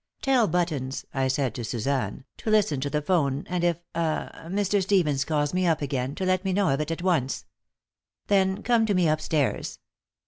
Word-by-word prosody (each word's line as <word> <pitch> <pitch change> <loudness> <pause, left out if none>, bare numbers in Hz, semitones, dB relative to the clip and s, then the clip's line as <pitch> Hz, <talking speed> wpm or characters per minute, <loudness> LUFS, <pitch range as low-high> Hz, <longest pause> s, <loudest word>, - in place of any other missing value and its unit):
"Tell 260 -5 +4
Buttons," 155 -8 -1
I 135 -1 +1
said 130 -3 0
to 120 - -5
Suzanne, 120 +1 -2
"to - - -4
listen 205 -10 +3
to 140 - -1
the 150 +1 -1
'phone, 145 -5 +1
and 180 -1 -2
if 170 -2 +2 0.2
ah 165 -2 -1 0.2
Mr. 200 +2 +1
Stevens 175 -8 +2
calls 145 -1 0
me 185 0 +1
up 160 -3 +1
again, 135 0 -2
to 190 - -2
let 185 0 +1
me 190 -1 0
know 200 0 +2
of 135 +2 +1
it 150 - -3
at 165 +1 -3
once. 155 -9 0 0.8
Then 195 0 +2
come 230 -2 +3
to 205 - +1
me 180 -2 +3
up 155 0 +1
stairs. 155 -3 -1
165 Hz, 200 wpm, -26 LUFS, 140-190 Hz, 0.8 s, Tell